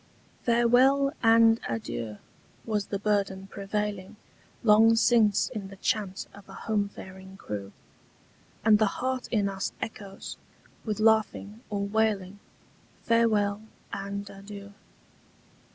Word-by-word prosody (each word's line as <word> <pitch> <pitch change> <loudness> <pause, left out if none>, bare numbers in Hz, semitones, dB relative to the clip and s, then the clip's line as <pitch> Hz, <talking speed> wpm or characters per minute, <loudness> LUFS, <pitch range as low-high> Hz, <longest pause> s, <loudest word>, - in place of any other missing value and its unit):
'FAREWELL 250 +4 +4
and 225 0 +6
adieu' 115 -1 -4 0.5
was 210 -3 -1
the 200 - -2
burden 195 -2 0
prevailing 200 0 -4 0.5
Long 225 +1 +6
since 225 -3 +4
in 215 -6 -6
the 195 - -11
chant 195 -1 -2
of 200 -1 -15
a - - -10
home 205 -2 0
faring 190 -1 -11
crew; 100 - -6 0.9
And 215 -2 +6
the 215 - +4
heart 255 0 -2
in 210 -4 +1
us 195 -1 -3
echoes, 200 -3 -7 0.5
with 215 -1 -2
laughing 220 -1 +2
or 205 -1 -2
wailing, 205 -2 0 0.6
Farewell 215 -3 +2 0.3
and 200 +1 -4
adieu. 200 0 -10
205 Hz, 115 wpm, -28 LUFS, 195-225 Hz, 0.9 s, and